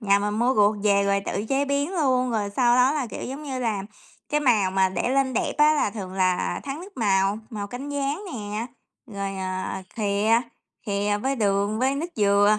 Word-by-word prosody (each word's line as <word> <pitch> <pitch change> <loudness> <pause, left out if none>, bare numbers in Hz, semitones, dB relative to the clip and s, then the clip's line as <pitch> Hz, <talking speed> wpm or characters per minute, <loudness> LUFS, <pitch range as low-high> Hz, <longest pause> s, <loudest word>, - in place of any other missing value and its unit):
nhà 200 -2 +3
mình 205 +1 -1
mua 245 +3 +2
ruột 210 -1 +4
về 200 -1 +4
rồi 200 0 +2
tự 205 - -2
chế 275 +1 +2
biến 285 +4 -1
luôn, 255 -6 +2
rồi 210 -3 -1
sau 240 -2 +4
đó 250 +2 +5
là, 285 -5 -1
kiểu, - - -7
giống 270 +4 -6
như 270 -3 -4
là, 220 -5 -1 0.5
cái 300 0 +1
màu 220 -9 +3
mà 190 0 +3
để 185 +5 -2
lên 270 0 +2
đẹp - - 0
á 300 +1 +6
là 290 - +1
thường 195 -3 -7
là 185 -1 0
thắng 275 +3 -5
nước 390 +3 -12
màu, 195 -2 +2
màu 205 -3 -4
cánh 250 +6 -7
gián 285 +4 -2
nè, 210 0 -4 0.4
rồi, 200 -3 -4
à, 185 0 -3
khìa, 215 +2 +2 0.5
khìa 205 0 0
với 270 +1 0
đường 205 -1 +1
với 260 +3 +2
nước 300 +4 -2
dừa, 205 0 +4
215 Hz, 210 wpm, -24 LUFS, 200-270 Hz, 0.5 s, á